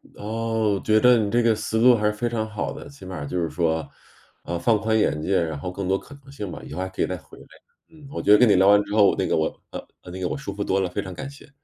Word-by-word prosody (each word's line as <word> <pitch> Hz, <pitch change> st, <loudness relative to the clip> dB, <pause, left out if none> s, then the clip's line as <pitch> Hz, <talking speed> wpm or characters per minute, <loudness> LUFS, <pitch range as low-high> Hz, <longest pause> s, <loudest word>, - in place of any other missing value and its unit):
哦， 110 Hz, -1 st, -1 dB
觉 110 Hz, 0 st, +4 dB
得 125 Hz, +2 st, +6 dB
你 105 Hz, -3 st, 0 dB
这 120 Hz, -, +3 dB
个 115 Hz, -1 st, +3 dB
思 110 Hz, +1 st, -3 dB
路 125 Hz, +1 st, +7 dB
还 105 Hz, -2 st, -1 dB
是 105 Hz, -, +2 dB
非 120 Hz, +3 st, -2 dB
常 110 Hz, -2 st, -2 dB
好 105 Hz, -1 st, -4 dB
的。 -, -, -9 dB
起 140 Hz, -7 st, -15 dB
码 95 Hz, 0 st, -7 dB
儿 70 Hz, -1 st, -5 dB
就 90 Hz, +4 st, -2 dB
是 85 Hz, -, -1 dB
说， 80 Hz, -1 st, -1 dB, 0.6 s
啊， 85 Hz, -, -3 dB
放 110 Hz, +5 st, +2 dB
宽 110 Hz, +1 st, +1 dB
眼 75 Hz, -7 st, +1 dB
界， 95 Hz, +4 st, +1 dB
然 80 Hz, -2 st, -4 dB
后 90 Hz, +5 st, -5 dB
更 95 Hz, 0 st, -5 dB
多 95 Hz, +1 st, +2 dB
可 145 Hz, -, -13 dB
能 135 Hz, -, -15 dB
性 105 Hz, -9 st, -6 dB
吧， -, -, -8 dB
以 -, -, -11 dB
后 90 Hz, -, -4 dB
还 95 Hz, -, -2 dB
可 95 Hz, -, -5 dB
以 -, -, +2 dB
再 90 Hz, -, -4 dB
回 -, -, -17 dB
来， -, -, -14 dB, 0.4 s
嗯。 155 Hz, -3 st, -15 dB
我 -, -, -4 dB
觉 -, -, +2 dB
得 105 Hz, -, +9 dB
跟 125 Hz, -, +5 dB
你 100 Hz, -, +5 dB
聊 95 Hz, +1 st, +4 dB
完 105 Hz, 0 st, +6 dB
之 100 Hz, 0 st, -7 dB
后， 105 Hz, -2 st, +5 dB
那 -, -, 0 dB
个 -, -, +1 dB
我 80 Hz, 0 st, -2 dB
呃， -, -, -7 dB, 0.3 s
那 95 Hz, -, -7 dB
个 90 Hz, -, -1 dB
我 -, -, -3 dB
舒 135 Hz, -8 st, -6 dB
服 100 Hz, +1 st, -3 dB
多 95 Hz, -1 st, 0 dB
了， 95 Hz, -2 st, -1 dB
非 100 Hz, -, -3 dB
常 95 Hz, -1 st, -8 dB
感 110 Hz, +10 st, -7 dB
谢。 140 Hz, +1 st, -15 dB
105 Hz, 340 characters per minute, -24 LUFS, 90-115 Hz, 0.6 s, 得